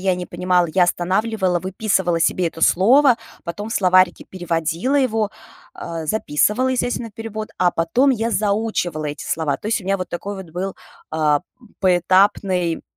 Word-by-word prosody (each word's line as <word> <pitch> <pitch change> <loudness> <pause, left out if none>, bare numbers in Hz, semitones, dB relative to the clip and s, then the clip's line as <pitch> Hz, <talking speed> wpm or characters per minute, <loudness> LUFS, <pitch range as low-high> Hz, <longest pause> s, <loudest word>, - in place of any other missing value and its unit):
я 185 -1 +1
не 180 0 -5
понимала, 180 -1 +1
я 185 - +4
останавливала, 185 +1 0
выписывала 190 -2 0
себе 170 +1 +1
это 165 - -12
слово, 245 +7 +5 0.3
потом 205 +5 -5
в - - -5
словарике 185 -1 +3
переводила 175 - -1
его, 225 -6 +1 0.4
а, 165 -1 -6
записывала, 215 - +1
естественно, 245 -2 -2
перевод, 220 -1 -6
а 180 -1 +3
потом 235 +13 +2
я 230 -2 0
заучивала 200 -6 -1
эти 145 0 -5
слова. 150 -4 -1
То - - -9
есть 225 - 0
у 185 - -13
меня 195 +1 +1
вот 185 -2 -5
такой 200 +4 -5
вот 190 -4 -9
был, 185 +3 -4 0.4
а, 155 0 +2 0.4
поэтапный 185 -1 +2
185 Hz, 155 wpm, -20 LUFS, 175-215 Hz, 0.4 s, слово